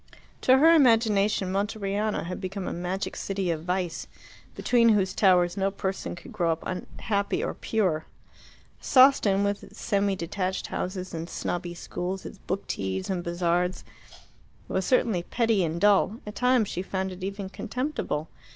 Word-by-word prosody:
To 260 +1 +6
her 320 +4 +7
imagination 220 - +3
Monteriano 205 +1 -1
had 180 +3 -5
become 190 0 -4
a - - -2
magic 180 +3 -3
city 195 -3 -2
of 160 -1 -3
vice, 180 -2 -2 0.5
beneath 230 -3 +4
whose 190 -2 +1
towers 180 -3 +4
no 195 0 +2
person 195 -2 -4
could 250 - -12
grow 170 -5 +1
up 160 - -9 0.4
happy 205 - 0
or - - -2
pure. 185 -8 -1 0.7
Sawston, 255 -7 +5
with 200 0 -1
its - - -13
semi 200 -2 +1
detached 185 +2 -3
houses 185 0 -4
and 165 +1 -5
snobby 175 0 -3
schools, 185 +2 -5
its 200 - -9
book 195 +2 -4
teas 95 - -3
and 180 -2 -2
bazaars, 175 +1 0 0.8
was 190 - -1
certainly 225 -8 +2
petty 225 +1 +1
and 165 0 -2
dull; 205 +2 +4
at 210 - -6
times 250 -2 +3
she 180 - -3
found 190 0 -3
it 185 0 -9
even 195 0 -4
contemptible. 230 - -3
195 Hz, 155 wpm, -27 LUFS, 180-215 Hz, 0.8 s, her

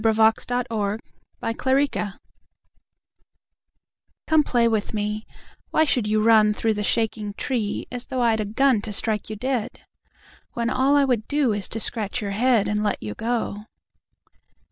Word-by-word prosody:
To 225 - +3
a - - +3
Squirrel 220 -1 +1 0.5
at 230 -1 -2
Kyle 260 0 +2
na 280 +1 +4
gno 205 - -2 2.2
COME 315 -2 +4
play 240 -4 +2
with 220 -1 -1
me; 210 +1 -3 0.4
Why 315 - +3
should 245 -7 +1
you 215 0 +2
runThrough 220 0 +4
the 210 - -3
shaking 210 -1 -1
treeAs 245 +1 -3
though 260 -2 -2
I'd 225 -2 +2
a 215 - -1
gunTo 225 0 +2
strike 215 +1 -1
you 215 - -4
dead? 250 0 -3 0.7
When 235 0 -1
all 270 +2 +3
I 285 -1 +5
would 240 -5 0
doIs 245 -9 0
to 225 - -4
scratch 220 +1 -2
your 205 -3 -3
headAnd 215 -1 +2
let 205 - -1
you 105 -1 -4
go. 220 - -3
225 Hz, 150 wpm, -23 LUFS, 210-250 Hz, 2.2 s, I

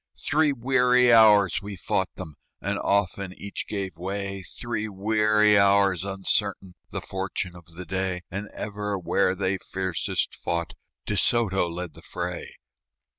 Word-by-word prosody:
Three 150 0 +2
weary 125 -1 +4
hours 105 -5 +6
we 100 0 -6
fought 95 +1 -1
them, 85 -5 -7 0.3
And 100 +1 -2
often 100 -1 0
each 100 - -5
gave 95 -5 -4
way; 100 +1 -4
Three 110 +3 -4
weary 105 +1 +3
hours, 100 -2 +4
uncertain 95 -1 -1 0.2
The - - -4
fortune 95 -1 -4
of 85 -1 -15
the 90 +1 -7
day; 95 +1 -2
And 100 +3 -5
ever 105 -1 -4
where 90 +1 +1
they 95 0 -1
fiercest 95 -3 -2
fought 85 -1 -3 0.3
De - - -1
Soto 95 -7 +2
led 85 -1 -5
the - - -13
fray. - - -5
100 Hz, 140 wpm, -26 LUFS, 95-105 Hz, 0.3 s, hours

